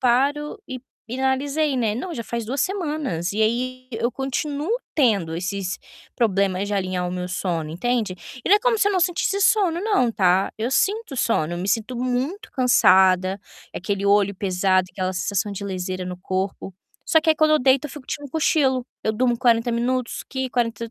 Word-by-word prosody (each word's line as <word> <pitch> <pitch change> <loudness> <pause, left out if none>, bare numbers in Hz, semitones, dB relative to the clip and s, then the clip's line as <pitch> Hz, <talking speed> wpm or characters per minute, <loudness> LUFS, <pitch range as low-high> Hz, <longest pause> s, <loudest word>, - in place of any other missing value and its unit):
paro 285 - +1
e 255 -1 -6 0.3
e 255 +3 -4
analisei, 275 +2 +1
né: 220 -4 +1
"Não, 345 +9 -4
já 230 -7 -5
faz 235 +1 -4
2 260 +4 -2
semanas". 295 - -2
E 215 - -2
aí 255 +3 0
eu 235 +2 -1
continuo 280 +4 -3 0.2
tendo 200 - +2
esses 185 0 -3 0.4
problemas 200 -4 +1
de 205 - -2
alinhar 185 -2 -1
o 180 - -5
meu 180 0 -4
sono, 170 -4 -2
entende? 220 +2 -1 0.3
E - - -2
não 410 - +7
é - - 0
como 480 +1 +2
se 410 -1 +3
eu - - 0
não 370 - +2
sentisse 365 +2 +1
sono 375 -4 +3
não, 400 - +2
tá. 190 -2 +2
Eu 225 +2 -1
sinto 395 - 0
sono, 170 -9 +1
eu 175 - -3
me 185 +3 -3
sinto 225 +5 0
muito 255 - -2
cansada, 190 -6 +4 0.3
aquele 200 +1 -3
olho 200 0 +3
pesado, 185 -1 +1
aquela 185 -1 -2
sensação 200 +2 -1
de 200 - -6
leseira 185 -1 -4
no 180 0 -5
corpo, 190 0 -3 0.3
só 320 - +4
que 320 0 +2
aí 315 - +3
quando 310 0 +4
eu 305 - +4
deito 265 +2 +3
eu - - -11
fico 295 -2 -10
tirando 290 +1 -5
um 270 - -17
cochilo, 275 -5 +2 0.2
eu 220 - +1
durmo 240 +1 +1
40 235 -1 +3
minutos 245 +1 -1
aqui, 265 -1 -3
40 230 -2 -1
235 Hz, 195 wpm, -23 LUFS, 190-280 Hz, 0.4 s, não